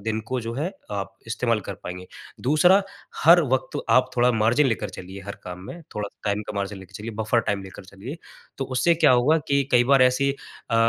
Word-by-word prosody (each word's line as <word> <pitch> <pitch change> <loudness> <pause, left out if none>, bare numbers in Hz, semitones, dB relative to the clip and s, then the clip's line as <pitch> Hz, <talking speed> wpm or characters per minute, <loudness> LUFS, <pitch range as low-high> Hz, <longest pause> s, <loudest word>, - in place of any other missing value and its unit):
दिन 110 0 -1
को 130 -1 -1
जो 115 0 -5
है 155 +8 -2 0.2
आप 100 -1 -4
इस्तेमाल 115 -1 0
कर 100 - -3
पाएँगे। 90 +1 -7 0.4
दूसरा 180 +7 +5 0.4
हर 170 +2 +8
वक़्त 130 - 0
आप 125 +3 +4
थोड़ा 125 +1 +4
मार्जिन 115 +6 +3
लेकर 110 -4 -1
चलिए 95 +2 -9
हर 100 - -6
काम 90 0 -7
में, 170 - -8
थोड़ा 105 -1 -3 0.2
टाइम 105 +1 0
का - - -3
मार्जिन 100 0 -3
लेके 95 -2 -14
चलिए, 110 +2 -6
बफर 110 +2 0
टाइम 100 -3 -2
लेकर 95 0 -11
चलिए। 100 - -9 0.4
तो 135 - -1
उससे 130 +6 +2
क्या 160 - +4
होगा 130 +6 +4
कि 140 0 +3
कई 120 0 +5
बार 135 0 +5
ऐसी 130 +2 +3
अ 125 - -9
115 Hz, 210 wpm, -24 LUFS, 100-135 Hz, 0.4 s, हर